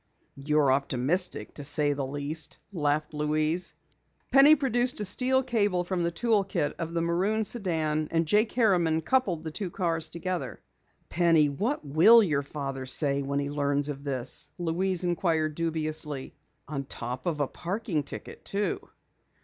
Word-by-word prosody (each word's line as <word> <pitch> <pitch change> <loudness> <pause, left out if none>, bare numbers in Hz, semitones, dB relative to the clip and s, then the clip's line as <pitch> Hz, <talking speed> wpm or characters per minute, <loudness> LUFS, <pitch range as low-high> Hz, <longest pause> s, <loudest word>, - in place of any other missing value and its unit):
"You're 145 0 +2
optimistic, 140 +7 0
to 145 - -6
say 145 +1 +3
the 140 -1 -3
least," 145 +2 -4 0.2
laughed 150 -2 -1
Louise. 155 +3 0 0.6
Penny 280 +3 +8
produced 250 -4 +1
a 210 - -2
steel 260 +6 +2
cable 205 -7 +1
from 180 0 -2
the 170 - +1
tool 215 +3 +1
kit 165 -6 -2
of 165 0 -4
the 165 - +1
maroon 190 +6 +1
sedan, 160 -9 -1
and 165 0 +1
Jake 210 +7 +2
Harriman 175 -9 +2
coupled 185 -5 0
the 160 - -5
two 190 +3 -4
cars 165 -3 -1
together. 180 +1 -4 0.5
"Penny, 165 -4 +3
what 205 - -2
will 180 +11 +7
your 145 -7 +1
father 135 -2 -5
say 140 +1 +1
when 140 0 -2
he 140 0 -2
learns 145 0 0
of 140 -1 -6
this?" 130 -3 -2
Louise 180 +2 0
inquired 165 -3 0
dubiously. 155 -3 -2 0.3
"On 140 -2 -4
top 125 0 -5
of 160 -4 -1
a 145 - +1
parking 180 - -3
ticket, 145 - -9
too!" 205 +1 -1
160 Hz, 155 wpm, -27 LUFS, 145-185 Hz, 0.6 s, Penny